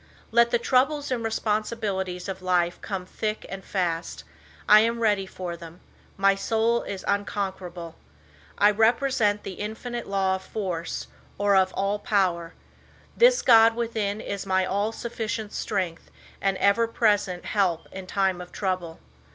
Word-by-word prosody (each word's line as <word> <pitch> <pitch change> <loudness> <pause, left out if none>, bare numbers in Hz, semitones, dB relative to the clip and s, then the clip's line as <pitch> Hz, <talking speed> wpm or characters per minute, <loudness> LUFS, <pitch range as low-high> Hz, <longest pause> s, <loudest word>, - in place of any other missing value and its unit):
"Let 235 +1 +5
the 240 - +3
troubles 275 +4 +1
and 240 -3 -1
responsibilities 210 -4 -2
of 190 -1 -5
life 175 -1 +1
come 195 -3 -4
thick 215 +3 -4
and 195 0 -7
fas 175 -4 -2
t. - - -12 0.4
I 210 - +9
am 230 +2 +1
ready 205 -4 +1
for 180 -2 -6
them. 170 +1 -12 0.4
My 195 0 +4
soul 225 +3 +1
is 195 -2 -6
unconquerable. 190 -4 -3 0.6
I 205 +1 +5
represent 225 -1 +2
the 190 - -7
Infinite 235 +3 -5
law 195 -1 +1
of - - -14
force, 180 -5 -4 0.3
or 205 0 +3
of 190 -1 +4
all 200 +1 -1
power. 180 -5 0 0.6
This - - +5
God 225 -1 +7
within 220 -3 -2
is 200 -1 -4
my 190 0 +2
all 200 +3 0
sufficient 225 -2 -4
strength 185 -5 -3 0.3
and 195 -1 +1
ever 200 +4 +3
present 205 -6 +1
he 210 - -3
lp 175 -4 +1
in 190 -1 -8
time 190 -2 0
of 180 - -10
trouble. 185 -4 -3
200 Hz, 150 wpm, -25 LUFS, 185-225 Hz, 0.6 s, I